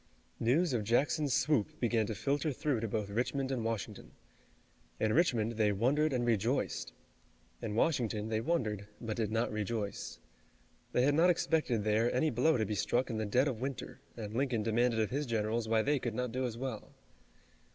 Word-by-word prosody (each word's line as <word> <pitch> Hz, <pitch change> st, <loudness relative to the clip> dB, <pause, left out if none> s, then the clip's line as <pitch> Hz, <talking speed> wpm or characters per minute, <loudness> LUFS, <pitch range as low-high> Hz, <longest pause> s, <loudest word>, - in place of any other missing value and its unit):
News 140 Hz, +7 st, +2 dB
of 115 Hz, -3 st, 0 dB
Jackson's 140 Hz, +6 st, +1 dB
swoop 125 Hz, -3 st, +1 dB
began 115 Hz, -3 st, +1 dB
to 110 Hz, -, -3 dB
filter 145 Hz, +5 st, 0 dB
through 135 Hz, -2 st, -1 dB
to 115 Hz, -, -2 dB
both 105 Hz, -1 st, -3 dB
Richmond 130 Hz, +4 st, -1 dB
and 125 Hz, -4 st, -1 dB
Washington. 115 Hz, -2 st, -4 dB, 0.9 s
In 110 Hz, 0 st, +2 dB
Richmond 115 Hz, -9 st, +2 dB
they 105 Hz, -2 st, +3 dB
wondered 135 Hz, +9 st, +2 dB
and 125 Hz, -2 st, 0 dB
rejoiced. 115 Hz, +3 st, 0 dB, 0.7 s
In 105 Hz, -2 st, -3 dB
Washington 110 Hz, -6 st, +1 dB
they 110 Hz, 0 st, 0 dB
wondered, 110 Hz, -, -1 dB
but 110 Hz, -2 st, -4 dB
did 110 Hz, -2 st, -1 dB
not 115 Hz, +2 st, 0 dB
rejoice. 105 Hz, -1 st, -3 dB, 0.7 s
They 125 Hz, -, +2 dB
had 145 Hz, +2 st, +4 dB
not 165 Hz, +4 st, +5 dB
expected 155 Hz, -10 st, +1 dB
there 110 Hz, +3 st, +2 dB
any 150 Hz, +5 st, +1 dB
blow 130 Hz, +5 st, +3 dB
to 110 Hz, -, +1 dB
be 105 Hz, -, -2 dB
struck 120 Hz, +5 st, 0 dB
in 110 Hz, -, -2 dB
the 110 Hz, -, -1 dB
dead 125 Hz, +7 st, +3 dB
of 125 Hz, -5 st, -3 dB
winter, 135 Hz, 0 st, -5 dB, 0.2 s
and 105 Hz, -2 st, -6 dB
Lincoln 125 Hz, -3 st, 0 dB
demanded 115 Hz, +1 st, +2 dB
of 110 Hz, +1 st, 0 dB
his 145 Hz, +2 st, -1 dB
generals 110 Hz, 0 st, -1 dB
why 110 Hz, 0 st, +2 dB
they 145 Hz, 0 st, +2 dB
could 120 Hz, -3 st, -3 dB
not 125 Hz, -1 st, -2 dB
do 130 Hz, +2 st, -1 dB
as 115 Hz, -1 st, -6 dB
well. 125 Hz, -4 st, -6 dB
115 Hz, 185 wpm, -33 LUFS, 110-135 Hz, 0.9 s, not